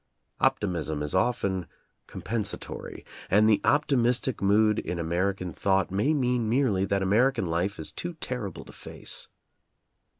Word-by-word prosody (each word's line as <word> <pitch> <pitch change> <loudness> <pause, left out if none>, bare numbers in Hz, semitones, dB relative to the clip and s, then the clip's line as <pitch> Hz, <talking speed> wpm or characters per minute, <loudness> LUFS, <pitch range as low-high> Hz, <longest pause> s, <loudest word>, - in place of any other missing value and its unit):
Optimism 80 -6 0
is 75 - -3
often 95 -4 0 0.4
compen 115 +2 -3
satory, - - -6 0.3
and 105 +3 +5
the 110 -2 +4
optimistic 130 -4 +2
mood 105 +2 +3
in 90 - -4
American 90 +2 -1
thought 95 -2 +1
may 105 +10 +1
mean 125 -6 +1
merely 115 -6 +2
that 100 0 0
American 115 +3 +2
life 85 +4 -1
is 80 - -2
too 175 0 -5
terrible 125 -9 -5
to - - -12
face. - - -6
100 Hz, 135 wpm, -27 LUFS, 95-125 Hz, 0.4 s, and